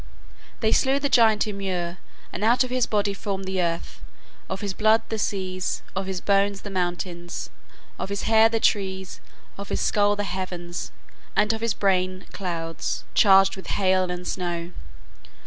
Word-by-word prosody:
They 220 -1 +2
slew 270 +3 +3
the 285 0 0
giant 220 -5 +5
Ymir, 185 -4 -3 0.3
and - - -4
out 240 +4 +4
of 255 - -6
his 255 -2 +1
body 205 -1 +1
formed 195 -1 -4
the 190 -1 -1
earth, 170 -1 -3 0.5
of 190 0 -4
his 200 -2 -2
blood 220 +2 +3
the 220 - -2
seas, 185 -2 -2
of 190 0 -2
his 190 -2 -3
bones 200 0 +2
the 205 - -7
mountains, 175 -1 -3 0.5
of - - -3
his 200 -1 -3
hair 225 0 +5
the 225 0 0
trees, 190 -3 0 0.4
of 200 - -7
his - - -1
skull 205 0 +2
the 205 - -2
heavens, 175 - -4 0.4
and 210 +1 +3
of 225 - -5
his 230 -2 0
brain 185 -1 +1
clouds, 165 -4 -3
charged 195 -2 +6
with 190 - -10
hail 185 -2 +2
and 180 0 -4
snow. 175 -2 -3
195 Hz, 165 wpm, -25 LUFS, 185-210 Hz, 0.5 s, charged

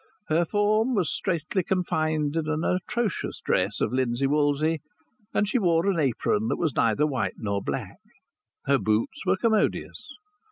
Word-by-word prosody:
Her 165 +2 +3
form 215 +6 +2
was 185 -6 +1
straitly 170 0 -1
confined 155 -4 0
in 160 -2 -1
an 155 +1 -1
atrocious 200 +4 -1
dress 95 +3 0
of 110 - 0
linsey 130 0 0
woolsey, 150 +2 +1 0.5
and 210 - +1
she 250 +5 +1
wore 170 -3 +2
an 195 -4 +1
apron 115 -5 +1
that - - 0
was 160 -7 -1
neither 115 +6 +2
white 130 -10 -1
nor 100 -2 -2
black. - - -4 0.7
Her 140 -1 +3
boots 110 +1 -1
were - - +3
commodious. 220 +8 0
155 Hz, 155 wpm, -26 LUFS, 130-185 Hz, 0.7 s, Her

